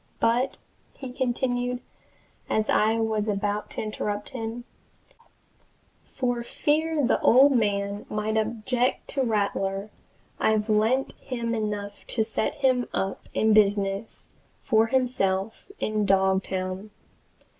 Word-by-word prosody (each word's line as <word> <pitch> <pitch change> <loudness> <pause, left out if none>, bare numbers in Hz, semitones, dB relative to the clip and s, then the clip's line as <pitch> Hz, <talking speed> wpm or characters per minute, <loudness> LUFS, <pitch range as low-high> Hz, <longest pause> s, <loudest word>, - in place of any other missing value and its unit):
But," 245 +4 +1 0.4
he 260 -2 -8
continued, 245 -1 -1 0.7
as 215 0 0
I 220 +1 +3
was 220 -1 0
about 205 0 -1
to - - -4
interrupt 210 -1 -3
him, 240 -2 -5 1.4
"for 245 -2 -2
fear 300 +4 0
the 245 - +2
old 270 +4 +6
man 205 -4 0
might 215 +1 -2
object 230 +3 0
to 275 - -1
Rattler, 200 -3 -1 0.5
I've 215 0 +1
lent 225 +5 +2
him 235 -3 -3
enough 210 -2 -4
to 225 - 0
set 220 - -1
him 255 -3 +2
up 195 0 -3
in 220 0 +3
business 200 0 +1 0.4
for 225 -3 +3
himself 225 - 0
in 215 -1 -1
Dogtown. 190 0 0
220 Hz, 115 wpm, -26 LUFS, 205-245 Hz, 1.4 s, old